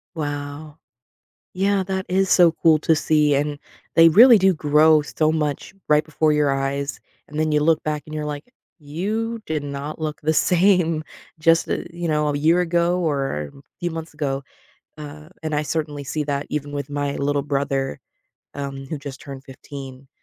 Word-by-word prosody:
Wow. 145 0 -5 0.8
Yeah, 195 +1 +1
that 190 0 -3
is 190 +1 +1
so 175 -3 +6
cool 160 -2 +6
to 160 - +3
see, 150 -1 +2
and 145 +1 -1 0.4
they 165 0 +8
really 230 +7 +8
do 190 -1 +3
grow 155 0 +4
so 155 +1 0
much 150 +3 -2
right 150 0 +4
before 155 0 +1
your 150 -2 +2
eyes, 140 +1 -3 0.3
and 150 +2 -5
then 155 - +1
you 150 - +3
look 160 +1 +2
back 150 -1 -2
and 155 - -8
you're 150 -1 -3
like, 150 - -6 0.3
"You 215 +10 -3
did 155 -2 -2
not 140 +1 -6
look 155 -1 -4
the 155 +1 +1
same 175 -2 +3 0.4
just, 165 +1 +3
uh, - - 0
you 170 0 -4
know, 150 -1 +1
a 145 - -1
year 165 +4 +3
ago, 175 +1 +1
or 135 - -2
a - - -14 0.2
few 175 0 -2
months 165 -1 -7
ago." 140 -2 -3 0.5
Uh, 150 +1 -10
and 155 -1 -2
I 150 - +1
certainly 150 -2 -3
see 150 +2 -3
that 140 0 -2
even 145 -1 -4
with 140 -1 -4
my 145 -1 -2
little 145 0 0
brother, 135 - -2 0.6
um, 140 -1 -6
who 155 - -4
just 140 -1 -8
turned 135 -4 -9
15. 135 0 -10
150 Hz, 180 wpm, -22 LUFS, 145-165 Hz, 0.8 s, they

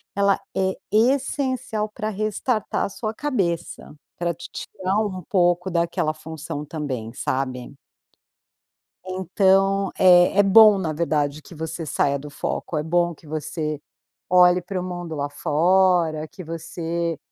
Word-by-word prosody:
ela 200 -1 +3 0.2
é 190 0 +1 0.2
essencial 255 -2 +1
pra 215 0 -4
restartar 215 +1 -1
sua 215 +1 -4
cabeça, 190 - -3 0.2
pra 170 0 -1
te 170 +2 -10
tirar 185 +1 -4 0.4
pouco 175 -1 +2
daquela 170 -2 0
função 155 -1 -7
também, 130 -8 -5
sabe? 130 0 -3 1.3
Então, 195 +1 +2
é 180 +1 +6
é 205 - +8
bom 210 0 +7
na 160 -4 -2
verdade 150 -2 -1
que - - -13
você 160 +1 -5
saia 140 0 +1
do 145 +1 -9
foco, 155 - -4
é 150 - 0
bom 175 +1 +1
que 155 - -20
você 155 0 -4 0.5
olhe 180 0 +6
pro 185 +1 -4
mundo 175 -3 -5
lá 145 -1 -2
fora, 165 +1 +2
que 185 - -10
você 165 0 -3
175 Hz, 130 wpm, -23 LUFS, 155-195 Hz, 1.3 s, é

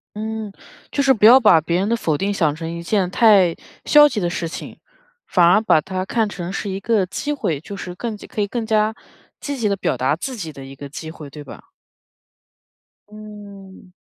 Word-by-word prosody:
嗯。 220 0 -5 0.4
就 280 - 0
是 270 -1 +4
不 215 -4 +2
要 245 +4 +9
把 210 -10 +5
别 170 +3 -1
人 200 - 0
的 235 - +1
否 155 -9 -1
定 200 +2 -1
想 155 -6 +1
成 165 0 -6
一 170 0 -6
件 190 -1 0
太 195 -5 +4 0.3
消 295 0 +7
极 215 - -3
的 175 -2 -1
事 175 -2 -3
情， - - -8 0.5
反 175 -3 +3
而 200 +5 +5
把 160 - +4
它 185 +2 -4
看 225 +1 0
成 180 -3 -6
是 200 +1 -4
一 190 +1 -4
个 210 -2 +1
机 290 +10 -4
会， 165 - -2
就 200 - -8
是 180 -1 -7
更 230 +2 -4
加 - - -12
可 215 - -4
以 205 - 0
更 230 +2 -4
加 215 0 +1 0.5
积 285 -2 -5
极 215 -4 0
地 200 - +1
表 160 - -1
达 130 +4 +1
自 255 +10 -6
己 165 -8 -6
的 140 -2 -11
一 135 0 -11
个 140 +1 -9
机 160 +3 -8
会， 155 -3 -10
对 145 +1 -10
吧？ 135 - -12 1.5
嗯。 205 -3 -12
195 Hz, 235 characters per minute, -20 LUFS, 170-220 Hz, 1.5 s, 要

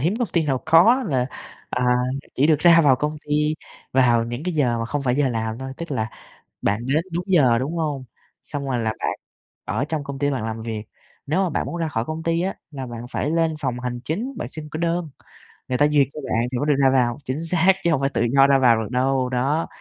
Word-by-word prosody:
hiếm 170 +9 +1
công 240 -6 0
ty 170 - +2
nào 130 -3 0
có 180 +12 +6
là, 130 -4 +1 0.4
à, 125 - -1 0.5
chỉ 140 - +3
được 155 -2 +4
ra 170 +1 +7
vào 140 -5 +5
công 150 +3 -2
ty 150 +1 +1 0.4
vào 120 -3 +4
những 120 +3 -5
cái 180 0 -2
giờ 125 -6 +1
mà 115 - -2
không 145 +4 -2
phải 125 -2 +1
giờ 140 -2 +2
làm 110 -1 -3
thôi, 130 0 -6
tức 170 +2 -7
là 110 -4 -2 0.5
bạn 105 +4 0
đến 150 +5 +1
đúng 170 +2 -2
giờ, 140 -11 +4
đúng 150 +7 -3
hông? 150 -5 -2 0.4
Xong 145 -2 -5
rồi 125 -2 0
là 110 -1 0
bạn - - -1 0.5
ở 135 - -1
trong 155 -2 -3
công 140 -1 -6
ty 145 0 +1
bạn 130 -5 -2
làm 110 0 -4
việc. 110 -2 -4 0.4
Nếu 160 +7 +1
mà 185 - 0
bạn 160 - -1
muốn - - -5
ra 165 - -1
khỏi 115 -6 -2
công 155 +1 -5
ty 165 +1 +1
á 190 +1 -1 0.2
là 135 -3 -6
bạn 120 0 -7
phải 150 - -1
lên 165 -1 +1
phòng 130 -5 -2
hành 125 -1 -4
chính, 205 - -3
bạn - - -4
xin 155 -1 -8
cái 155 - -4
đơn, 170 -1 -1 0.6
người 125 - 0
ta 145 - +4
duyệt 145 -3 +3
cho 150 - -7
bạn 115 -1 0
thì 125 - -2
mới 145 - -1
được 150 - +4
ra 135 - +6
vào, 125 -2 +2
chính 140 +5 -3
xác, 180 +2 +4
chứ 170 - +2
hông 140 - +1
phải 135 - +1
tự - - 0
do 135 0 +6
ra 140 -1 +4
vào 120 -3 +4
được 110 - -5
đâu, 130 0 +1
đó, 135 +6 0
140 Hz, 255 wpm, -22 LUFS, 125-160 Hz, 0.6 s, ra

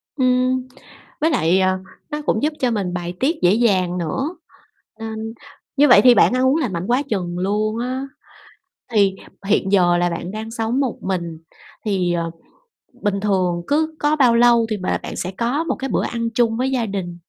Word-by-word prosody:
Ừm, 255 -1 +1 0.5
với 320 - +3
lại, 185 - +2
ờ, 185 0 +2 0.3
nó 300 0 -3
cũng 220 - 0
giúp 305 +1 +1
cho 250 -2 +1
mình 195 -5 -2
bài 175 0 -4
tiết 305 +6 +1
dễ 180 +2 +4
dàng 190 -6 +2
nữa, 265 - -2 0.6
nên 225 0 -5 0.4
như 295 +1 +6
vậy 240 -5 +8
thì 245 -2 +7
bạn - - +5
ăn 255 +1 +2
uống 280 +4 +3
lành 245 - -1
mạnh 170 +3 -3
quá 250 +3 +2
chừng 175 -4 -2
luôn 210 +4 0
á. 260 +3 -3 0.9
Thì 200 -3 +3 0.3
hiện 200 -1 +1
giờ 175 -3 +4
là 175 0 +1
bạn 170 +2 -5
đang 220 +2 -6
sống 230 +3 -1
một 260 -4 -1
mình 170 -4 -3 0.5
thì, 185 -4 0
ờ, 170 -1 -2 0.7
bình 200 -2 0
thường 185 -4 0
cứ 315 +2 0
có 295 +1 +2
bao 250 -5 +4
lâu 235 -1 +5
thì 215 - -1
b 185 - -10 0.2
bạn - - -6
sẽ 185 - -3
có 250 +7 0
một - - -2
cái 270 - -5
bữa - - 0
ăn 230 -1 -2
chung 230 -2 +2
với 260 +1 0
gia 245 -3 0
đình? 190 -4 -4
220 Hz, 200 wpm, -20 LUFS, 185-255 Hz, 0.9 s, vậy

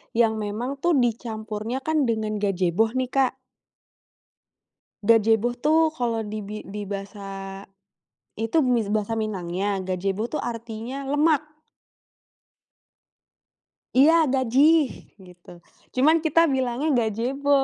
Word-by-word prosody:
yang 225 -2 +3
memang 230 +7 -3
tuh 345 +2 +2
dicampurnya 225 -1 -2
kan 310 -2 +1
dengan 215 -2 -1
Gajebo 195 +3 +1
nih, 255 -1 -1
Kak. 265 -1 +1 1.7
Gajebo 225 +2 +3
tuh 315 +5 +3
kalau 235 -2 -1
di 215 +1 -4
bi 210 +1 -6
di 205 +1 -6
bahasa, 195 -1 -7 0.7
itu 225 +8 0
mis 235 -5 +1
bahasa 210 +1 -1
Minangnya, 200 -2 -2
Gajebo 195 +3 -2
tuh 305 - -3
artinya 235 +3 -5
lemak. 295 +2 +2 2.5
Iya, 295 +5 +7 0.2
Gajih, 275 +5 +4 0.4
gitu. 175 -1 -17 0.5
Cuman 310 +5 +4
kita 330 +1 +4
bilangnya 260 +3 0
Gajebo. 245 +5 -1
230 Hz, 105 wpm, -24 LUFS, 210-270 Hz, 2.5 s, Iya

